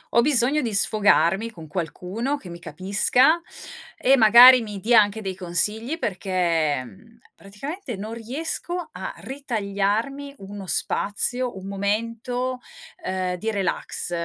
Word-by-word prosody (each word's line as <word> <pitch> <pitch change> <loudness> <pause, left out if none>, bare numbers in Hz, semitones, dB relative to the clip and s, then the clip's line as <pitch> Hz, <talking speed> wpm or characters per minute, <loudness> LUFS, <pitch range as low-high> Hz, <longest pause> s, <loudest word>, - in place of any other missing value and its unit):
Ho 235 - +6
bisogno 280 +2 +3
di 230 -6 -2
sfogarmi 200 0 +3
con 165 -7 -12
qualcuno 190 - -4
che 190 - -12
mi 170 0 -9
capisca 200 - +2 0.6
e, 270 - +4
magari, 245 +2 +8
mi 210 -3 -7
dia 230 +4 +5
anche 205 +1 -2
dei 190 -2 -4
consigli, 210 - -1
perché 175 - -1
mhmm, 230 - -17 0.2
praticamente, 255 - -7
non 210 +3 -7
riesco 320 +9 -4
a - - -6
ritagliarmi 240 +2 -3
uno 195 -1 -9
spazio, 205 - 0
un 190 - -9
momento, 230 +5 -2 0.4
ehm, 185 -1 -2
di 220 +5 -3
relax 195 -3 -2
215 Hz, 125 wpm, -23 LUFS, 190-250 Hz, 0.6 s, magari